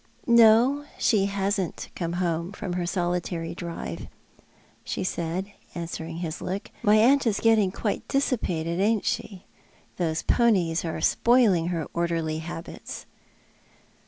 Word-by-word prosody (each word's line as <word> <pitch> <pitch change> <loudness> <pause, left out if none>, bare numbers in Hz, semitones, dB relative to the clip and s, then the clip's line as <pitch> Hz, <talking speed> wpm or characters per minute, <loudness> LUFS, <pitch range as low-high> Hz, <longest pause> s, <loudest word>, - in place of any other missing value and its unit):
" 235 - -32
No, 235 +4 +5
she 200 -4 +2
hasn't 195 -2 -2
come 170 -1 -3
home 175 0 -1
from 190 -2 -5
her 175 -1 -2
solitary 175 -2 -2
drive," 170 - -6 0.8
she - - -3
said, 185 +3 -3 0.2
answering 165 -1 -5
his 170 -1 -4
look. 190 +2 -4
*' - - -25
My 210 -2 +4
aunt 255 +5 +5
is 210 -3 +1
getting 220 -4 +3
quite 205 +1 -3
dissipated, 180 - -1
ai»'t 215 +1 +2
she? 195 -4 -3 0.5
Those 165 -2 -1
ponies 185 -9 +2
are 165 -2 -4
spoiling 225 -9 +3
her 170 -3 -2
orderly 165 -2 -1
habits." 165 +1 -7
180 Hz, 130 wpm, -26 LUFS, 170-215 Hz, 0.8 s, No